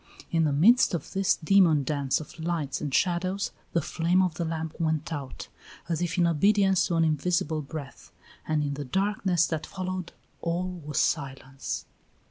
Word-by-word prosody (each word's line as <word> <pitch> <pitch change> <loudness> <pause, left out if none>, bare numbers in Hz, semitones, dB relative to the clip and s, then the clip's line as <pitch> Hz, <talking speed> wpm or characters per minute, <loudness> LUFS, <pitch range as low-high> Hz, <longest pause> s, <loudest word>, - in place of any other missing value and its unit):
In 165 -1 +3
the 150 - +1
midst 195 - +5
of 160 - -6
this 195 0 +2
demon 165 -4 +4
dance 140 -1 0
of 155 +2 -11
lights 160 -4 -2
and 145 - -3
shadows, 185 +5 0 0.2
the 170 - +1
flame 175 +5 +2
of 180 -3 0
the 170 - -3
lamp 160 0 -4
went 160 0 -1
out, 140 -4 -6 0.4
as 170 -1 -1
if 175 +1 -1
in 175 - +4
obedience 195 +3 +3
to 170 - -1
an 165 - +3
invisible 160 0 0
breath, 145 -1 -9 0.4
and 155 -1 +1
in 145 -1 -2
the 145 +1 -4
darkness 190 +2 +1
that 160 -2 -3
followed 185 -2 -4 0.3
all 175 +2 -1
was 150 0 -2
silence. 135 -2 -2
165 Hz, 170 wpm, -27 LUFS, 150-180 Hz, 0.4 s, midst